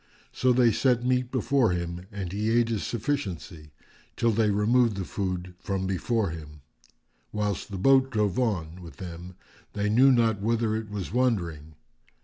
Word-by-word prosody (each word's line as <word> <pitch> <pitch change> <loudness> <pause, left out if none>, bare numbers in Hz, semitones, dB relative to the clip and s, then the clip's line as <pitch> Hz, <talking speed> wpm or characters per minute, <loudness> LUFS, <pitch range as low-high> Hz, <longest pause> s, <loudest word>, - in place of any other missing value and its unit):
So 130 - +2
they 120 -1 +4
set 125 0 +1
meat 125 -1 +1
before 130 -2 +2
him 85 +1 -4
and 95 -4 -5
he 105 +2 -1
ate 115 0 +3
his 110 -4 -1
sufficiency, 100 - -4 0.5
till 115 -1 +2
they 110 0 +2
removed 110 +2 +2
the 95 - -3
food 90 -2 -4
from 95 0 -3
before 95 +1 0
him, 75 -2 -10 0.7
whilst 105 -2 -2
the 100 - -5
boat 135 +6 +4
drove 105 -3 0
on 90 -8 -2
with 85 -2 -11
them 90 -1 -8 0.4
they 105 0 -1
knew 130 +5 +6
not 115 -4 +2
whither 110 0 +1
it 110 -1 -4
was 100 -1 -5
wandering. 85 -12 -1
105 Hz, 160 wpm, -27 LUFS, 90-120 Hz, 0.7 s, knew